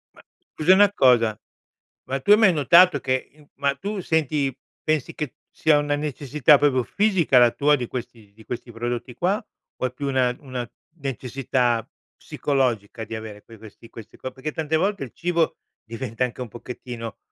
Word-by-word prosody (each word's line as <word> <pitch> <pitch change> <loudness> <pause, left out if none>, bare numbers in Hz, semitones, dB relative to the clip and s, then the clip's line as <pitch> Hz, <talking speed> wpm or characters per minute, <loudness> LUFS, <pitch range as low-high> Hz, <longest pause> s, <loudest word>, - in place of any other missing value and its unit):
Ma - - -17 0.3
scusa 155 +4 +4
una 200 +1 +6
cosa, 115 - +3 0.7
ma 135 +1 -1
tu 200 - +1
hai 210 - +9
mai 215 -5 +5
notato 170 +4 +5
che, 130 0 -2
uhm 150 -1 -21
ma 140 0 0
tu 205 +1 -4
senti 150 -5 0 0.3
pensi 155 -4 -1
che 150 -5 -5
sia 155 -1 +3
una 145 0 0
necessità 145 -1 +3
proprio 135 -4 +2
fisica 185 - +3
la 120 -1 +6
tua 145 +3 +3
di 125 -4 -4
questi 115 -4 -8
di 110 +1 -18
questi 120 0 -6
prodotti 120 +2 -4
qua, 195 - 0 0.3
o - - -2
è 125 - -2
più 140 +3 -5
una 130 -2 +1
una 130 -4 -6 0.3
necessità 125 -3 -1 0.3
psicologica 120 -6 -2
di 110 +1 -6
avere, 110 -2 -8
poi, 115 +1 -15
questi 110 +1 -14
questi 115 -2 -12
qua? 130 - -6
Perché 135 +4 -5
tante 160 0 -2
volte 195 +1 0
il 125 - -8
cibo 170 -1 0 0.3
diventa 115 +1 -4
anche 125 0 -3
un 125 - -4
pochettino 120 -1 -8
130 Hz, 175 wpm, -23 LUFS, 120-155 Hz, 0.7 s, hai